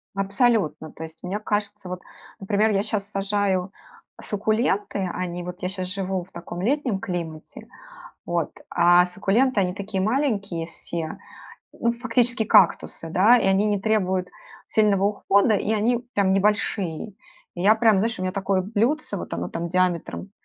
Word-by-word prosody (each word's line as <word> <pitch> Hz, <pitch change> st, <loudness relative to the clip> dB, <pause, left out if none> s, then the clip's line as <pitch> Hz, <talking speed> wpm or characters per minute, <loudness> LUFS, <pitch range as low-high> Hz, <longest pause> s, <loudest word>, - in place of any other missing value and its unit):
Абсолютно! 195 Hz, -, +1 dB
То 160 Hz, -, -9 dB
есть 160 Hz, 0 st, -10 dB
мне 195 Hz, +4 st, -3 dB
кажется 205 Hz, -2 st, -3 dB
вот, 180 Hz, 0 st, -5 dB, 0.4 s
например, 205 Hz, +2 st, +1 dB
я 200 Hz, 0 st, +1 dB
щас 205 Hz, -2 st, -2 dB
сажаю 195 Hz, -2 st, 0 dB, 0.5 s
суккуленты, 210 Hz, -1 st, 0 dB
они 175 Hz, -1 st, -4 dB
вот 180 Hz, +2 st, -8 dB
я 180 Hz, -, 0 dB
щас 185 Hz, -1 st, -4 dB
живу 190 Hz, -1 st, -3 dB
в 185 Hz, -, -19 dB
таком 175 Hz, +1 st, -7 dB
летнем 245 Hz, -3 st, 0 dB
климате, 165 Hz, -4 st, -6 dB, 0.6 s
вот, 170 Hz, -2 st, -1 dB, 0.2 s
а 175 Hz, +1 st, +5 dB
суккуленты- 205 Hz, +6 st, +1 dB
они 180 Hz, -1 st, 0 dB
такие 200 Hz, -1 st, -3 dB
маленькие 205 Hz, -, -1 dB
все, 165 Hz, -1 st, -5 dB, 0.6 s
ну, 235 Hz, -, 0 dB
фактически 240 Hz, -1 st, +1 dB
кактусы, 165 Hz, -3 st, +3 dB
да, 210 Hz, +9 st, +5 dB
и -, -, 0 dB
они 195 Hz, +2 st, +3 dB
не 205 Hz, -2 st, 0 dB
требуют 190 Hz, -4 st, 0 dB, 0.4 s
сильного 210 Hz, -3 st, +2 dB
ухода, 200 Hz, +1 st, +3 dB
и 215 Hz, +2 st, 0 dB
они 240 Hz, +3 st, 0 dB
прям 195 Hz, -2 st, +2 dB
небольшие. 195 Hz, -2 st, 0 dB, 0.5 s
И 175 Hz, -, -4 dB
я 210 Hz, +3 st, +6 dB
прям, 220 Hz, -3 st, +4 dB
знаешь, 225 Hz, +1 st, 0 dB
у -, -, -6 dB
меня 185 Hz, 0 st, -1 dB
такое 190 Hz, -1 st, 0 dB
блюдце, 230 Hz, +10 st, -1 dB
вот -, -, -6 dB
оно -, -, -3 dB
там 170 Hz, +1 st, -4 dB
диаметром 180 Hz, +2 st, -1 dB
195 Hz, 155 wpm, -24 LUFS, 180-215 Hz, 0.6 s, я